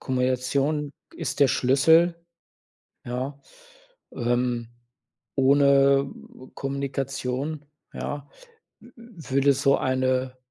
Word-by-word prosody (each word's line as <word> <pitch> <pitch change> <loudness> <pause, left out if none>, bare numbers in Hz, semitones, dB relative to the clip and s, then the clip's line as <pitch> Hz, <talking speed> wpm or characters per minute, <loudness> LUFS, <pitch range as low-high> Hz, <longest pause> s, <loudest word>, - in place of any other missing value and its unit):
Kommunikation 130 +3 -1 0.2
ist - - -4
der 140 - +6
Schlüssel, 160 +8 +4 0.9
ja, 130 +3 -5 0.7
ähm 120 -1 -1 0.7
ohne 140 0 +4 0.4
Kommunikation, 135 +1 -3 0.3
ja, 145 -1 -5 0.5
w 240 - -16 0.3
würde 140 -3 +2
so 140 +1 +3
eine 130 0 0
135 Hz, 75 wpm, -25 LUFS, 130-140 Hz, 0.9 s, der